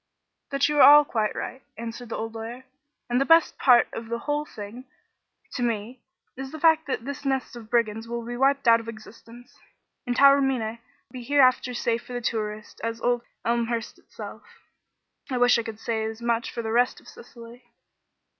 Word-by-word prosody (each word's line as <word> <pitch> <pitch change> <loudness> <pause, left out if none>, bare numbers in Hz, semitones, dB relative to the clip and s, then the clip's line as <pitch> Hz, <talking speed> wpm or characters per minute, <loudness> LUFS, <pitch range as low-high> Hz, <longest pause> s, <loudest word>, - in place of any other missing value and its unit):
"That 275 0 +1
you 300 0 -1
are - - +8
all 295 +1 +9
quite 220 -5 -1
right," 260 - -6 0.2
answered 230 +1 -7
the - - -4
old 225 0 -5
lawyer. 230 +3 -7 0.4
"And 245 +2 +1
the - - +5
best 330 +1 +4
part 245 -3 +5
of 225 0 -7
the 235 - -2
whole 295 +4 -2
thing, 220 +1 -9 0.7
to - - -5
me, 235 +1 -2 0.3
is 265 +1 -7
the 315 - -8
fact 320 0 +4
that 245 -4 -3
this 280 0 -6
nest 270 -2 -2
of 225 -2 -11
brigands 225 -1 0
will 235 0 -5
be 240 +1 -5
wiped 275 +1 +1
out 230 0 +7
of 230 - -11
existence, 230 +2 -13 0.5
and 245 - 0
Taormina 270 -5 +3 0.3
be 255 - -8
hereafter 255 0 +3
as 245 - -4
safe 235 0 0
for 245 -1 -4
tourists 215 -2 -4
as 230 0 -3
old 245 +1 +1 0.2
Elmhurst 235 -1 -1
itself. - - -10 0.9
I 255 - -1
wish 245 -1 +4
I - - 0
could 225 -2 -8
say 225 -1 -2
as 220 0 -5
much 235 0 -1
for 235 - -5
the 220 - -3
rest 245 +2 +2
of - - -21
Sicily." 240 - -13
240 Hz, 190 wpm, -25 LUFS, 230-265 Hz, 0.9 s, all